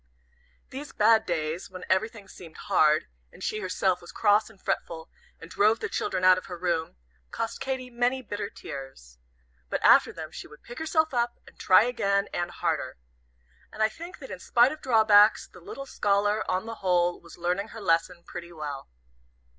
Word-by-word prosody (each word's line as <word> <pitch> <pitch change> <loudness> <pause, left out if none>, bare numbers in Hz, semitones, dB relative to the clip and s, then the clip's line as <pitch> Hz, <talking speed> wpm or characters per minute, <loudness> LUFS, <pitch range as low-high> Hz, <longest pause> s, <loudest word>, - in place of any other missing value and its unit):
These 280 +3 -8
bad 220 0 +4
days, 165 +1 -2
when 185 -1 -9
everything 210 +2 -1
seemed 165 -3 -13
hard, 155 0 +3 0.3
and - - -13
she 215 - -2
herself 185 -1 0
was 175 - -11
cross 210 0 +3
and 215 -3 -19
fretful, 160 -3 -4 0.3
and 165 - -10
drove 215 +2 +3
the - - -3
children 185 -3 -2
out 185 0 +6
of - - -14
her 180 -2 -7
room, 170 - -2 0.3
cost 225 - -4
Katy 260 -2 -4
many 245 +2 0
bitter 205 -2 -4
tears. 135 - -10 0.5
But - - -1
after - - +6
them - - -8
she - - -9
would 150 - -17
pick 240 - -9
herself 315 -1 +1
up, 240 -1 0
and - - -17
try 185 +2 +6
again, 200 -5 0
and 175 - -2
harder. - - -2 0.7
And 220 - -1
I 220 - +4
think 340 - -10
that 265 - -10
in 185 - -6
spite 240 +7 +4
of 310 - -8
drawbacks, 220 -4 +5
the - - -16
little 275 +10 -8
scholar, 205 -2 +1
on 185 +3 -1
the 230 0 -6
whole, 175 -2 +1
was 170 - -14
learning 180 +4 -1
her 225 - -10
lesson 170 -1 0
pretty 175 0 -8
well. 150 - -7
200 Hz, 185 wpm, -27 LUFS, 175-230 Hz, 0.7 s, out